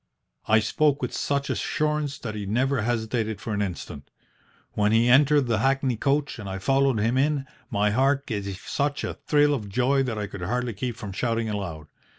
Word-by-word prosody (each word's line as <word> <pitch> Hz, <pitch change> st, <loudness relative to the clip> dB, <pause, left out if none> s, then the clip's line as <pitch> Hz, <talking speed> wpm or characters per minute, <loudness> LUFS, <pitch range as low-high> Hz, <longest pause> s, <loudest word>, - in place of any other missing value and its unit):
"I 110 Hz, 0 st, +5 dB
spoke 150 Hz, +5 st, +1 dB
with -, -, -2 dB
such 140 Hz, -1 st, -1 dB
assurance 150 Hz, -2 st, -1 dB
that 110 Hz, -3 st, -6 dB
he 105 Hz, -2 st, -5 dB
never 130 Hz, +4 st, +1 dB
hesitated 110 Hz, -2 st, -1 dB
for 110 Hz, -, -4 dB
an 105 Hz, -, -1 dB
instant. 85 Hz, -7 st, -5 dB, 0.6 s
When 105 Hz, 0 st, +1 dB
he 115 Hz, +2 st, +4 dB
entered 145 Hz, +3 st, +5 dB
the 115 Hz, -2 st, +1 dB
hackney 135 Hz, +1 st, +1 dB
coach 140 Hz, +2 st, 0 dB
and 100 Hz, -2 st, -6 dB
I 95 Hz, -, -3 dB
followed 135 Hz, +4 st, +2 dB
him 115 Hz, +5 st, +1 dB
in, 145 Hz, 0 st, +1 dB, 0.2 s
my 105 Hz, +1 st, +1 dB
heart 135 Hz, +4 st, +2 dB
gave 100 Hz, -4 st, -3 dB, 0.2 s
such 145 Hz, 0 st, -1 dB
a -, -, -2 dB
thrill 145 Hz, -1 st, +4 dB
of 110 Hz, -7 st, -3 dB
joy 130 Hz, +6 st, +2 dB
that 125 Hz, -5 st, -2 dB
I 105 Hz, -, -2 dB
could 100 Hz, -2 st, -8 dB
hardly 120 Hz, +6 st, -1 dB
keep 120 Hz, +4 st, -4 dB
from 105 Hz, -4 st, -7 dB
shouting 115 Hz, +2 st, -1 dB
aloud. 85 Hz, -7 st, -5 dB
120 Hz, 190 wpm, -25 LUFS, 105-140 Hz, 0.6 s, I